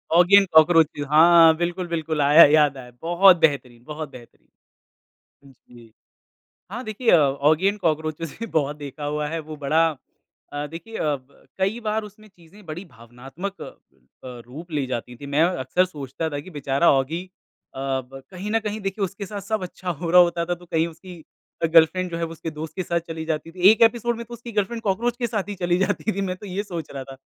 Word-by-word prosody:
Oggy 180 +3 +6
and 195 - +4
cockroach 160 +1 +6
भी। 145 - -6
हाँ, 165 +1 +7
बिल्कुल, 175 +1 -2
बिल्कुल। 160 -2 -2
आया, 150 +4 +8
याद 145 -2 +3
आया। 125 -1 -11
बहुत 175 +2 +5
बेहतरीन 130 -7 0
बहुत 150 +1 -7
बेहतरीन। 120 -3 -16 1.0
हुँ 135 - -17
जी। 120 -2 -19 0.8
हाँ, 240 +4 -5
देखिए 220 +2 0
औगी 150 +4 +2
एंड 205 +1 +1
कॉकरोचेस 155 -2 -2
भी 230 - -3
बहुत 145 -1 0
देखा 145 0 -8
हुआ 150 0 -2
है। 165 +1 -3
वो 155 0 -9
बड़ा 155 +3 +2 0.7
अ, 145 0 -4
देखिए 170 +9 -9
अ, 150 -2 0
ब 130 +1 -24
कई 195 +5 0
बार 220 -1 -2
उसमें 210 +1 -14
चीज़ें 190 +2 -19
बड़ी 165 +5 -7
भावनात्मक 135 - -9
अ, - - -9 0.5
रूप 125 +7 -10
ली 145 -3 -1
जाती 125 -1 -5
थी। 140 +4 -10
मैं 145 +3 +1
अक्सर 180 +1 +1
सोचता 150 -2 -5
था 145 - -4
कि 185 - -13
बेचारा 140 0 +1
औगी 145 +6 -1 0.5
अ, - - -9
ब 135 0 -4
कहीं 190 +3 -6
न 225 - +2
कहीं 215 0 -4
देखिए 195 0 -2
उसके 200 +1 -6
साथ 205 0 -6
सब 205 0 -3
अच्छा 180 0 -8
हो 165 +1 -4
रहा 180 0 +8
होता 170 -1 +2
था 175 - -1
तो 175 +1 -17
कहीं 165 -1 0
उसकी 170 +1 -12 0.4
गर्लफ्रेंड 165 +3 +4
जो 170 - -4
है 165 - -1
उसके 165 0 -6
दोस्त 155 +1 -8
के 185 - -1
साथ 170 0 -1
चली 160 -1 -6
जाती 160 0 -3
थी। 180 +2 -13
एक 220 +1 +2
एपिसोड 235 +1 +3
में 235 - -7
तो 240 - -9
उसकी 235 0 -10
गर्लफ्रेंड, 220 +3 -2
कॉकरोच 225 +4 -1
के 240 - 0
साथ 210 -3 -3
ही 205 - -4
चली 175 -1 0
जाती 205 +3 0
थी, 200 - -4
मैं 185 -2 -2
तो 205 - -11
ये 195 +2 -3
सोच 175 -6 -7
रहा 135 -1 -5
था। 135 0 -11
165 Hz, 210 wpm, -23 LUFS, 145-190 Hz, 1.0 s, आया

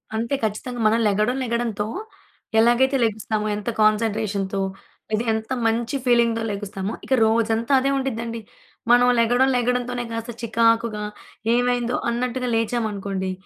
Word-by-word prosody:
అంతే 230 +5 -1
ఖచ్చితంగా, 235 +3 -3
మనం 225 +2 +3
లెగడం 215 +6 +1
లెగడంతో 230 -3 -2 0.7
ఎలాగైతే 255 +4 +4
లెగుస్తామో 215 0 -2
ఎంత 210 +3 -4
కాన్సంట్రేషన్‌తో. 210 -2 +1 0.5
అయితే 215 +2 +1
ఎంత 220 +3 -4 0.2
మంచి 230 +4 -1
ఫీలింగ్‌తో 235 -2 +3
లెగుస్తామో, 200 0 -4
ఇక 265 - 0
రోజంతా 225 +3 +1
అదే 270 +1 0
ఉండిద్దండి. 230 -3 -3 0.5
మనం 245 0 +6
లెగడం 245 +3 +3
లెగడం 250 0 +1
తోనే 245 -1 -3
కాస్త 230 +1 -4
చికాకుగా 230 -1 +1 0.5
ఏవైందో 245 0 +1
అన్నట్టుగా 250 +1 -2
లేచామనుకోండి, 205 -5 -2
230 Hz, 120 wpm, -23 LUFS, 215-245 Hz, 0.7 s, మనం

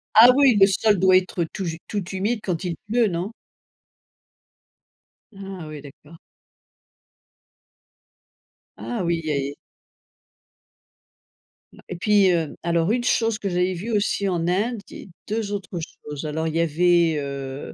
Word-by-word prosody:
Ah 225 +3 +10
oui, 270 -6 +5
le 195 - +8
sol 205 0 +2
doit 185 0 +6
être 185 -1 -1
tout 195 - -5
j 165 -1 -4
tout 200 -4 -3
humide 205 +5 -1
quand 180 -2 -2
il 175 -2 -2
pleut, 235 +1 +2
non? 185 +3 -3 2.0
Ah 195 -3 -8
oui, 155 -1 -8
d'accord. 145 +3 -15 2.6
Ah 235 -4 -4
oui 170 -1 0
et 140 -1 -2 2.2
Ma - - -16
et - - -4
puis, 200 +1 +3
heu, 165 -4 -1
alors 170 +2 +1
une 240 +1 0
chose 225 -3 +1
que 200 - -2
j'avais 180 +1 0
vu 200 +7 -5
aussi 205 -1 0
en 170 -2 -1
Inde 215 +6 0
et - - -10 0.2
2 215 -1 -2
autres 190 -3 -5
choses. 150 -2 -8
Alors, 160 +2 -2
il 160 - -3
y 165 - +2
avait, 170 0 +3
heu, 140 -1 -6
180 Hz, 140 wpm, -23 LUFS, 165-205 Hz, 2.6 s, Ah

